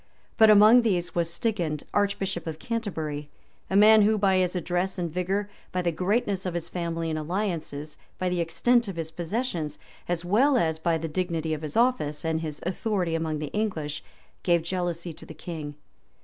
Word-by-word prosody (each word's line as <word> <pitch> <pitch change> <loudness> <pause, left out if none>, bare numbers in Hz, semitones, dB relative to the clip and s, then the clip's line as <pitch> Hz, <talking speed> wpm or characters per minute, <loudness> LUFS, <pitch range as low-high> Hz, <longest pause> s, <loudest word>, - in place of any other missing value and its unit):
But 220 -1 +7
among 215 +4 +8
these 180 -6 0
was 170 -1 0
Stigand, 170 -8 -1
archbishop 195 -3 0
of 160 -1 -4
Canterbury, 160 -9 -4 0.4
a 190 - -1
man 215 +2 +8
who, 215 +1 +4
by 195 -2 +3
his 185 0 +1
address 180 +2 -1
and 170 -3 -3
vigor, 190 +3 -1 0.2
by 180 0 -1
the 170 - +1
greatness 195 +2 0
of 180 -2 -3
his 170 -1 -3
family 165 -2 -2
and 155 - -1
alliances, 160 -4 -3 0.2
by 185 - -1
the 180 -1 0
extent 235 +9 +2
of 195 - -5
his 160 -1 -4
possessions, 170 - -3 0.3
as 175 0 -2
well 255 +9 +4
as 160 -6 +1
by 165 0 +1
the 165 +1 -4
dignity 165 -1 -2
of 155 - -4
his 155 +2 -4
office, 165 -12 +1
and 160 0 0
his 155 -2 -5
authority 185 -1 -1
among 160 -1 -1
the 150 -1 -5
English, 165 -9 -2 0.4
gave 170 -2 +2
jealousy 175 -1 -3
to 160 - -13
the 160 - -10
king. 155 -2 -6
175 Hz, 185 wpm, -26 LUFS, 160-200 Hz, 0.4 s, among